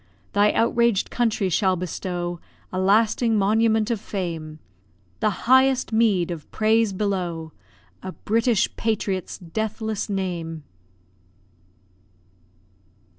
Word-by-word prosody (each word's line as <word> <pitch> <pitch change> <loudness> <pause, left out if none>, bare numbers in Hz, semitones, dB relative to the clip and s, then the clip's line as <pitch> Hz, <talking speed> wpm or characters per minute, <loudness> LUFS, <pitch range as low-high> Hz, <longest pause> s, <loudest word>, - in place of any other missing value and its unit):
Thy 205 +1 +4
outraged 235 -2 +2
country 225 -5 0
shall 185 +1 +2
bestow 175 0 -4 0.3
A 185 - -1
lasting 220 +3 +3
monument 220 +2 +2
of 225 -4 -2
fame, 165 -6 -5 0.6
The 215 - +2 0.2
highest 260 -1 +4
meed 205 -6 +2
of 160 -4 -7
praise 220 0 +2
below 180 -5 -2 0.5
A 190 - -6
British 225 +2 0
patriot's 205 -4 -2
deathless 220 +4 -3
name! 170 -5 -3
205 Hz, 95 wpm, -23 LUFS, 180-225 Hz, 0.6 s, Thy